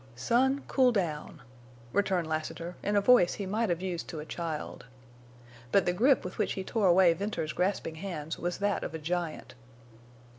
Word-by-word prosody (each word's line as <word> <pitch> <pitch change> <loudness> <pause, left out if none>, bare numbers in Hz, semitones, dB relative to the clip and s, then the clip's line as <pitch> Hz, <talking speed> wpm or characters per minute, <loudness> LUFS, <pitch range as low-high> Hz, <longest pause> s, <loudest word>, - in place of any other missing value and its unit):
"Son—cool 255 - +2
down," 160 - -3 0.5
returned 190 -4 +1
Lassiter, 160 +2 -4
in 205 - -1
a 205 - +4
voice 220 -5 +5
he 200 - -4
might 215 +3 0
have 175 +1 -1
used 180 -3 -3
to 160 - -6
a 150 - -6
child. 160 -6 -5 0.8
But 195 - +4
the 180 - +1
grip 255 +8 +3
with 185 - -7
which - - +1
he 190 - -4
tore 210 0 +1
away 175 -1 +6
Venters's 165 -4 -3
grasping 180 -3 -1
hands 160 -5 -5
was 175 0 -2
that 205 0 0
of - - -5
a - - -2
giant. 165 +1 -3
180 Hz, 175 wpm, -29 LUFS, 165-205 Hz, 0.8 s, away